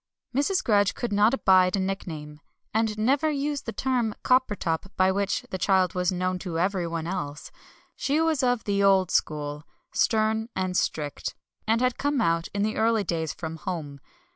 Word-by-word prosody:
Mrs. 360 +8 +1
Grudge 205 -3 +3
could 240 -4 -3
not 205 +2 +4
abide 185 -7 +4
a - - -1
nickname, 160 -6 -4 0.3
and 220 -1 +1
never 275 +8 +2
used 290 -1 -2
the - - -1
term 245 -4 -1
"Coppertop" 210 -10 +1
by 185 0 +4
which 200 +1 -1
the 185 - -3
child 185 -2 +2
was 180 0 +1
known 185 0 -1
to 175 -3 -4
everyone 170 -3 -1
else; 165 -5 -5 0.4
she 285 +3 0
was 320 -3 +2
of 245 -3 +1
the 200 -1 0
old 190 -2 +4
school, 150 -1 -1 0.3
stern 220 0 +1
and 185 -1 -1
strict, 150 -5 -2 0.3
and 225 +2 +2
had 255 -1 +1
come 285 -1 0
out 165 -5 +1
in 200 0 -1
the 215 +1 -1
early 225 -1 +2
days 165 -4 -2
from 160 -1 -6
Home. 155 -5 -5
195 Hz, 170 wpm, -26 LUFS, 175-230 Hz, 0.4 s, not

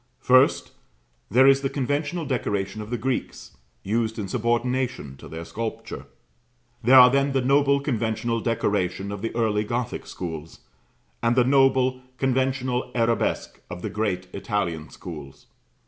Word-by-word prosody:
First, 130 +2 +4 0.6
there 130 +5 +5
is 135 0 +6
the 135 - -1
conventional 145 +5 -2
decoration 105 -6 -2
of 105 - -8
the 120 - -2
Greeks, 125 - -4 0.3
used 110 +2 -1
in 105 -3 -3
subordination 120 - -1
to - - -12
their 80 +1 -7
sculpture. 115 +4 -6 0.7
There 130 +3 +6
are 125 -1 +9
then 140 +1 +2
the 135 - +2
noble 140 +1 +3
conventional 115 -3 -1
decoration 100 -4 -1
of 100 -1 -6
the 115 - -2
early 110 -3 +1
Gothic 120 +2 -3
schools, 80 -3 -7 0.6
and 115 +1 +2
the 125 - +5
noble 130 -1 +3 0.2
conventional 130 -1 0
arabesque 115 -1 0
of 90 - -7
the - - -3
great 95 -4 -2
Italian 95 -7 -2
schools. 75 -6 -10
120 Hz, 140 wpm, -24 LUFS, 105-130 Hz, 0.7 s, are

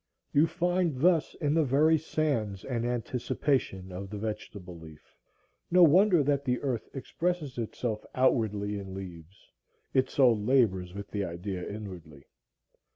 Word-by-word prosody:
You 150 +3 +5
find 175 -4 0
thus 165 0 +3
in 145 -2 0
the 160 0 +3
very 150 +4 +3
sands 135 -11 -2
an 120 -3 -2
anticipation 120 -4 -1
of 95 +2 -6
the 105 - -6
vegetable 100 -4 -6
leaf. 80 -2 -15 0.5
No 180 +1 +6
wonder 175 +1 +5
that 140 0 +1
the 125 -2 0
earth 125 -5 -2
expresses 150 0 -3
itself 110 -1 -3
outwardly 105 -5 +1
in 95 -1 -8
leaves, 90 -1 -10 0.4
it 130 -1 +2
so 130 -4 +5
labors 105 -5 +1
with 100 0 -7
the 100 -1 -1
idea 90 +1 -5
inwardly. 90 -9 -9
115 Hz, 140 wpm, -29 LUFS, 95-145 Hz, 0.5 s, No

